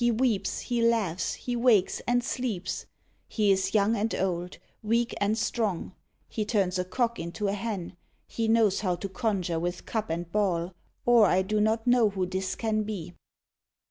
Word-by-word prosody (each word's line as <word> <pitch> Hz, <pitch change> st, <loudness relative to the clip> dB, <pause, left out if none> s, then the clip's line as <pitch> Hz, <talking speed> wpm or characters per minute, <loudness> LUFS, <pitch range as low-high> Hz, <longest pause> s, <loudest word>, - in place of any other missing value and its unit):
He 240 Hz, -, +4 dB
weeps, 225 Hz, -4 st, 0 dB
he 240 Hz, -1 st, -1 dB
laughs, 215 Hz, -7 st, +1 dB
he 245 Hz, -, -4 dB
wakes, 235 Hz, -6 st, +3 dB
and 245 Hz, 0 st, +2 dB
sleeps. 235 Hz, -8 st, -3 dB, 0.4 s
He 210 Hz, -3 st, +2 dB
is 190 Hz, +2 st, +1 dB
young 210 Hz, +2 st, +3 dB
and 220 Hz, +1 st, -1 dB
old, 180 Hz, -1 st, -2 dB, 0.2 s
weak 230 Hz, +2 st, +1 dB
and 205 Hz, +2 st, +2 dB
strong. 210 Hz, -5 st, -1 dB, 0.3 s
He 215 Hz, -, -2 dB
turns 195 Hz, -4 st, 0 dB
a -, -, +1 dB
cock 235 Hz, +6 st, -1 dB
into 170 Hz, +5 st, -3 dB
a 200 Hz, -, 0 dB
hen. 200 Hz, -4 st, -4 dB, 0.3 s
He 225 Hz, -1 st, -2 dB
knows 220 Hz, -3 st, +3 dB
how 185 Hz, -4 st, 0 dB
to 195 Hz, -, -5 dB
conjure 190 Hz, -5 st, -1 dB
with 175 Hz, +2 st, -3 dB
cup 220 Hz, -2 st, -3 dB
and 170 Hz, +1 st, -3 dB
ball, 180 Hz, -4 st, 0 dB, 0.3 s
Or 235 Hz, -3 st, +6 dB
I 185 Hz, +1 st, +3 dB
do 210 Hz, +2 st, 0 dB
not 220 Hz, +1 st, +1 dB
know 245 Hz, -3 st, +4 dB
who 190 Hz, -2 st, -2 dB
this 190 Hz, +1 st, -3 dB
can 220 Hz, -1 st, 0 dB
be. 200 Hz, -5 st, -5 dB
210 Hz, 175 wpm, -28 LUFS, 185-230 Hz, 0.4 s, Or